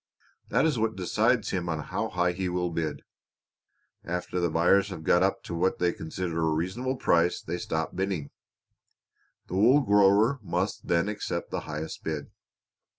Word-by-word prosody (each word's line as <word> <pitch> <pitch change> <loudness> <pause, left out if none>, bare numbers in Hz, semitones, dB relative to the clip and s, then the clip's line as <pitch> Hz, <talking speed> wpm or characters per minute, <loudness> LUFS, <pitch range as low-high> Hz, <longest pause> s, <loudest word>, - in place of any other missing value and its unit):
That - - +3
is 150 -7 +1
what 110 0 0
decides 110 +5 +1
him 90 -2 -2
on 80 - -1
how 75 - -3
high 90 0 +1
he 90 +1 -2
will 90 -1 -1
bid. 80 -3 -3 1.0
After 90 +1 -3
the 85 -1 +1
buyers 90 +5 +3
have 90 -4 -7
got 85 - +4
up 95 +1 +1
to - - -6
what 85 +3 +1
they 90 -1 +1
consider 80 +1 -4
a 80 - +2
reasonable 95 +12 -1
price 85 -5 +2
they 90 - -4
stop 80 -1 -3
bidding. 95 -6 -2 1.1
The - - -9
wool 125 +8 +6
grower 105 +3 +4
must 90 +1 -2
then 85 +2 +2
accept 105 0 -4
the - - -1
highest 75 +1 -5
bid." 75 -2 -4
90 Hz, 165 wpm, -27 LUFS, 85-100 Hz, 1.1 s, wool